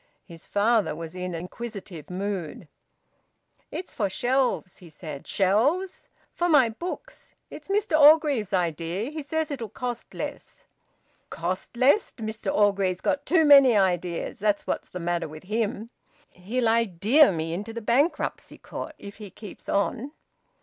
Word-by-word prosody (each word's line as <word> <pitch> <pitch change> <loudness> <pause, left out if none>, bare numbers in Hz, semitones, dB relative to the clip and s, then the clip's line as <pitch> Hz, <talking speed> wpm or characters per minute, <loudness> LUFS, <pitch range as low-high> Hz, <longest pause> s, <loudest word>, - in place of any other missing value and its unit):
His 165 -3 -13
father 215 -2 +2
was 165 0 -7
in 180 -1 -4
an 165 - -4
inquisitive 195 -4 -8
mood. 185 -4 -4 1.0
"It's 365 - -6
for 205 -4 -1
shelves," 245 -3 0
he 175 - -13
said. 150 -2 -9
"Shelves?" 255 - +1 0.2
"For 350 0 0
my 275 -7 +5
books. 360 - -8 0.2
It's - - -10
Mr 395 -5 +1
Orgreave's 290 - +5
idea. 175 - -1
He 310 0 -5
says 315 +1 -2
it'll 240 -6 -4
cost 245 +2 -6
less." - - -7 0.6
"Cost 185 +7 -4
less! 280 - +3
Mr 220 -1 -3
Orgreave's 195 -3 +2
got 285 0 -1
too 325 -1 +4
many 275 -6 +8
ideas 180 -3 0
that's 205 0 +1
what's - - -3
the 180 - -6
matter 170 -1 -1
with 155 +1 -11
him. 215 +2 -2 0.4
He'll 225 +7 -2
idea 225 - +4
me 165 -1 -3
into 205 +6 -5
the 230 - -5
bankruptcy 255 +9 0
court - - -7
if 200 0 -10
he 210 -2 -9
keeps 200 +1 -11
on." 245 +7 -1
210 Hz, 145 wpm, -26 LUFS, 180-265 Hz, 1.0 s, many